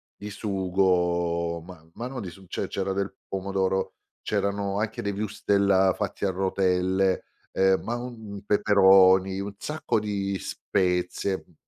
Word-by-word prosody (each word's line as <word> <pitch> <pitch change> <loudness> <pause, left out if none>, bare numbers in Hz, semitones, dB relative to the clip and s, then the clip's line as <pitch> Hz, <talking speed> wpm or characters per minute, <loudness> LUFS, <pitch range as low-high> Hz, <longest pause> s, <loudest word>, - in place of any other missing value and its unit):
di 105 - -8
sugo, 90 -4 0
ma 85 -1 -13
ma 115 - -5
no 130 -1 -6
di 100 -6 -5
su 95 +2 -14
cioè - - -3
c'era 95 0 -2
del 100 0 -3
pomodoro, 95 0 -1 0.3
c'erano 100 0 -1
anche 110 +1 -2
dei 100 - -1
wurstel 100 -2 +2
fatti 100 -1 -3
a - - +2
rotelle, 95 0 +1 0.3
ehm, 95 0 +3
ma 120 - -2
uhm, 110 -5 -7
peperoni, 95 -2 +5
un 100 +1 -4
sacco 150 -1 -1
di 100 -2 -2
spezie, 90 +1 -1
mh. 90 - -19
95 Hz, 140 wpm, -26 LUFS, 95-100 Hz, 0.3 s, peperoni